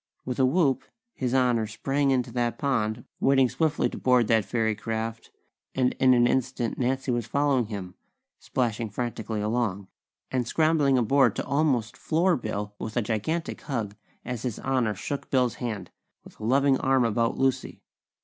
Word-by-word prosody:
With 125 0 -4
a 130 - +5
whoop 140 -2 +2 0.3
His 130 -1 -2
Honor 120 -4 +2
sprang 135 +6 0
into 130 -2 +1
that 120 -1 -1
pond, 115 -6 -1
wading 135 -2 +4
swiftly 160 +1 +1
to - - -7
board 125 -2 +4
that 110 -3 +3
fairy 110 -2 0
craft; 110 +1 -4 0.5
and 130 -1 +2
in 130 -1 +6
an 120 0 +4
instant 125 -1 -1
Nancy 130 +1 0
was 120 -2 -1
following 140 -2 +1
him, 95 -4 -6 0.5
splashing 115 -3 -2
frantically 110 -1 -3
along, 105 -3 -1 0.4
and 125 -2 -1
scrambling 155 -2 +3
aboard 135 +4 +3
to - - -3
almost 135 -5 +1
floor 170 +6 +1
Bill 105 -5 -4
with 110 +1 -5
a 120 - +2
gigantic 120 +11 -2
hug 110 -8 -3 0.3
as 125 -3 -4
His 120 -4 -3
Honor 125 -5 0
shook 140 +8 -5
Bill's 125 -3 +1
hand, 105 -7 -4 0.3
with - - -16
a 110 - -5
loving 135 +2 +3
arm 130 -2 +3
about 115 +1 0
Lucy. 135 -1 -1
125 Hz, 165 wpm, -26 LUFS, 110-135 Hz, 0.5 s, in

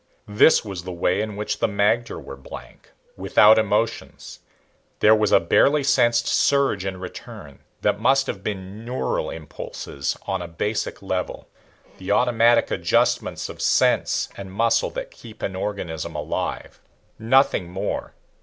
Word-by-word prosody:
This 105 +6 +4
was 95 -4 -6
the 90 - -6
way 90 +3 0
in 110 -1 -4
which 105 +1 -3
the - - +2
magter 105 +3 0
were - - -9
blank, 70 - -12 0.3
without 110 +2 +5
emotions. 110 +1 -2 0.6
There 105 - +6
was 110 -2 +2
a - - +6
barely 140 - +3
sensed 120 -3 +3
surge 140 -9 +2
and 95 -1 -4
return 75 -6 -10 0.2
that - - +1
must 135 +4 +3
have 95 - -5
been 100 +1 -6
neural 125 +2 -2
impulses 70 -3 -6
on 95 -1 -2
a 90 - -5
basic 100 +5 -3
level 95 -1 -4 0.5
the 95 - -8
automatic 120 +1 +3
adjustments - - 0
of - - -9 0.2
nerve - - +1
and 95 -1 -9
muscle 115 +4 +1
that - - -6
keep 110 -1 -13
an 95 - -3
organism 95 -5 -4
alive. - - -4 0.4
Nothing 115 -6 +2
more. 90 +2 -4
105 Hz, 145 wpm, -23 LUFS, 95-115 Hz, 0.6 s, There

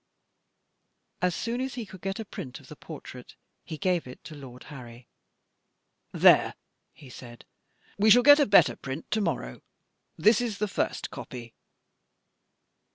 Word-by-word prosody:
As 180 -2 +1
soon 235 +2 -3
as 265 -1 -4
he 240 -3 -5
could 185 -3 -13
get 195 +1 -4
a 220 - -5
print 130 -9 -8
of - - -18
the - - -10
portrait, - - -11 0.3
he 155 - -7
gave 175 -1 0
it 125 - -12
to 160 - -10
Lord 130 -3 -11
Harry. 120 -2 -12 1.0
"There," - - +5 0.4
he 140 - -16
said, 120 -1 -12 0.5
"we 215 +2 +4
shall 245 +3 +7
get 290 +2 +8
a 290 - +3
better 200 - +5
print 135 +4 -7
to 215 - +1
morrow. 130 - -3 0.6
This 215 +7 +4
is 230 -4 -3
the 210 0 -1
first 195 - -3
copy." 120 -2 -9
180 Hz, 155 wpm, -27 LUFS, -, 1.0 s, get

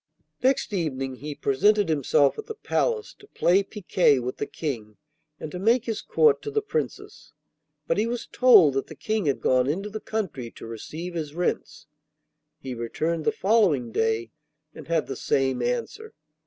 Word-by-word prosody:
Next 260 -4 +1
evening 135 -7 -2
he 145 +2 -6
presented 200 +10 +2
himself 145 - +2
at 440 - -7
the 445 - -6
palace 450 0 -1
to 415 - -17
play 185 - +3
picquet 185 -7 +2
with 125 0 -4
the 145 - -3
King 115 -9 -5 0.4
and 155 - -6
to 180 - -5
make 230 +4 +3
his 220 -2 -3
court 455 -2 +3
to 435 - -5
the 430 0 -1
Princess. 450 +2 -5 0.5
But - - 0
he 225 - +1
was 240 0 -3
told 215 - +6
that 135 - -2
the - - -10
King 215 -6 -2
had 140 - 0
gone 130 0 +3
into 195 +8 -2
the 215 - -5
country 185 - -4
to - - -10
receive 155 +10 -7
his 155 -3 -5
rents. 175 -4 -2 0.7
He 130 -1 -6
returned 155 +8 -2
the - - +3
following 185 - +2
day, 110 +1 0 0.4
and - - -11
had 165 -1 +1
the 135 - -5
same 130 -2 0
answer. 245 - -3
170 Hz, 175 wpm, -25 LUFS, 135-225 Hz, 0.7 s, told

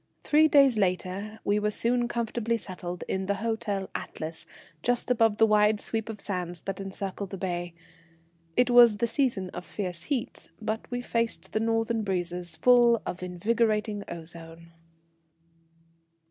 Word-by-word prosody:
Three 310 +1 +5
days 275 -6 +5
later 195 +3 -1
we 205 +1 +2
were 210 0 +1
soon 240 +3 +1
comfortably 235 -1 -1
settled 180 -4 -6
in 190 0 -2
the 200 - +1
Hotel 205 -2 -2
Atlas, 160 +1 -6 0.3
just 245 +1 +1
above 225 -3 +3
the 225 - +6
wide 210 0 +4
sweep 225 0 -2
of 215 -2 -6
sands 180 -4 -4
that 195 0 -4
encircle 195 0 -5
the 195 - -7
bay. 175 -2 -3 0.8
It 250 0 +4
was 240 -3 +7
the 235 - +1
season 230 -7 0
of - - -7
fierce 180 -3 -3
heat, 260 -5 -3
but 220 0 -4
we 245 0 -3
faced 230 -1 -2
the 215 - 0
northern 225 0 0
breezes 180 -3 -3
full 240 -2 +5
of 180 - -5
invigorating 210 +3 0
ozone. 165 0 -9
210 Hz, 145 wpm, -28 LUFS, 185-230 Hz, 0.8 s, was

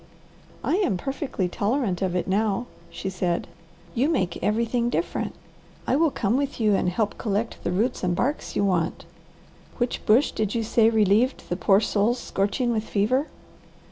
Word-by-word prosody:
"I 350 - +1
am 375 - +1
perfectly 270 - -2
tolerant 200 0 -1
of 185 -2 0
it 180 - -1
now," 210 +3 +1 0.2
she - - -6
said. 180 -2 -1 0.5
"You 265 +6 +2
make 185 - -1
everything 235 +2 +1
different. 340 - -2 0.5
I - - +2
will 320 +2 +4
come 230 -3 0
with 280 -2 -2
you 215 -2 +3
and 190 - +2
help 210 +3 -1
collect 215 +1 -2
the - - -1
roots 220 +7 0
and 175 -1 +1
barks 280 - -2
you 200 - +2
want. 175 -3 0 0.7
Which 245 -1 -1
bush 235 +7 +5
did 215 -1 -2
you 230 - 0
say 220 +1 +4
relieved 220 +3 +2
the 175 - 0
poor 195 +1 +4
souls 220 +3 +1
scorching 205 +3 -1
with 220 -2 0
fever?" 250 +9 +1
215 Hz, 170 wpm, -25 LUFS, 195-245 Hz, 0.7 s, bush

